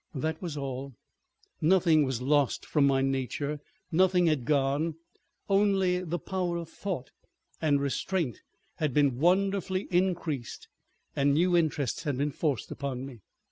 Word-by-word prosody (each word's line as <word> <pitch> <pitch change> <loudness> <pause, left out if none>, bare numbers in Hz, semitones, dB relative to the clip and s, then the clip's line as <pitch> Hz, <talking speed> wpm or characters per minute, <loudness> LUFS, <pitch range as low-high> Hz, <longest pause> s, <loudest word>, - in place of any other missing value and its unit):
That 160 +4 -2
was 165 -5 -4
all. 135 -1 -5 0.7
Nothing 165 -3 +4
was 130 -2 -3
lost 145 0 +2
from 145 -3 +3
my 135 -1 +2
nature, 135 +2 -2 0.3
nothing 180 +1 +4
had 155 -7 +1
gone, 145 +3 +1 0.5
only 195 -2 +2
the 175 0 -2
power 180 0 -2
of 170 -1 -6
thought 175 -11 -5 0.5
and 145 -3 +3
restraint 140 - -2 0.4
had 150 -5 -1
been 140 -4 +3
wonderfully 190 +2 +1
increased 175 -8 -1 0.5
and 140 0 +3
new 175 +3 +3
interests 155 -6 0
had 145 -5 -2
been 145 +2 0
forced 140 -6 -2
upon 135 -2 -4
me. 130 -4 -10
150 Hz, 140 wpm, -29 LUFS, 140-180 Hz, 0.7 s, Nothing